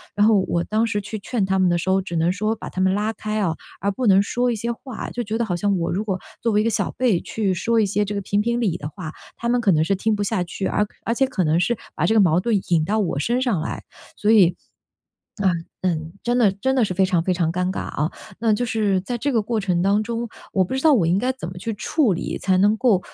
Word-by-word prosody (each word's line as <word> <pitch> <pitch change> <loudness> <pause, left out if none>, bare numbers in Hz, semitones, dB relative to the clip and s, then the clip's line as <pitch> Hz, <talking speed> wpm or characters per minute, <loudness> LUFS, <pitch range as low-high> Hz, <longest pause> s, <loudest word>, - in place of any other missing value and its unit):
然 205 0 +4
后 215 -3 +5
我 170 0 0
当 220 +2 0
时 205 -1 -1
去 210 +1 -6
劝 205 -1 -1
她 190 0 +1
们 185 - +4
的 175 - +2
时 190 - -2
候， 190 0 +3
只 175 -2 -6
能 165 +2 +2
说 215 +4 -1
把 - - -8
她 185 - -6
们 190 0 +3
拉 210 +2 0
开 215 0 -3
啊， 170 -4 +1 0.3
而 200 +1 +1
不 250 +3 -2
能 195 0 +6
说 245 +3 0
一 - - -1
些 235 +3 -2
话。 235 0 -7
就 245 - -4
觉 220 +1 -2
得 235 - +1
好 180 -5 -1
像 200 0 +1
我 170 0 -1
如 205 +4 -2
果 190 -3 -1 0.2
作 230 -2 +1
为 210 - +4
一 - - 0
个 230 - +2
小 210 - 0
辈， 235 -9 +2
去 205 -4 +1
说 225 +5 +1
一 - - +3
些 205 +1 0
这 205 - -4
个 200 - -2
评 200 +2 0
评 235 +2 0
理 180 -6 0
的 145 - -6
话， 160 -1 -7 0.3
她 235 - -2
们 245 0 +2
可 210 -5 +3
能 155 -1 +3
是 195 +4 +1
听 215 +3 0
不 205 - -1
下 200 -3 0
去， 190 +3 -4
而 210 - +1 0.2
而 230 - -1
且 270 - +3
可 205 -8 -1
能 160 +2 +2
是 235 +6 +1 0.2
把 - - 0
这 220 - +2
个 220 - +5
矛 175 -2 +4
盾 220 +3 0
引 160 -3 +3
到 215 +3 0
我 170 -8 -1
身 240 - 0
上 235 -10 +1
来。 160 - -4 0.3
所 210 - -1
以， 180 -6 +5 0.9
嗯 175 -4 +1 0.2
嗯， 160 -3 -1
真 240 +1 +1
的 215 -5 +5
真 230 +8 -1
的 250 -4 +3
是 190 - -2
非 190 +1 +2
常 175 -3 +1
非 185 - 0
常 170 -2 0
尴 180 +1 -1
尬 - - -4
啊。 150 +3 -2 0.3
那 225 -2 +3
就 225 +4 +1
是 205 -4 +1
在 240 +5 -3
这 280 +4 -1
个 225 - +3
过 220 +1 -1
程 180 -3 0
当 200 +3 +2
中， 235 +1 -3 0.2
我 190 - +3
不 220 - -4
知 265 - 0
道 315 0 +5
我 200 - +3
应 180 +3 +2
该 255 +4 0
怎 255 -10 -7
么 180 - -8
去 225 +5 -4
处 240 - +1
理， 170 - -3
才 185 -1 +1
能 205 +3 +4
够， 220 -6 +3
205 Hz, 310 characters per minute, -22 LUFS, 185-225 Hz, 0.9 s, 能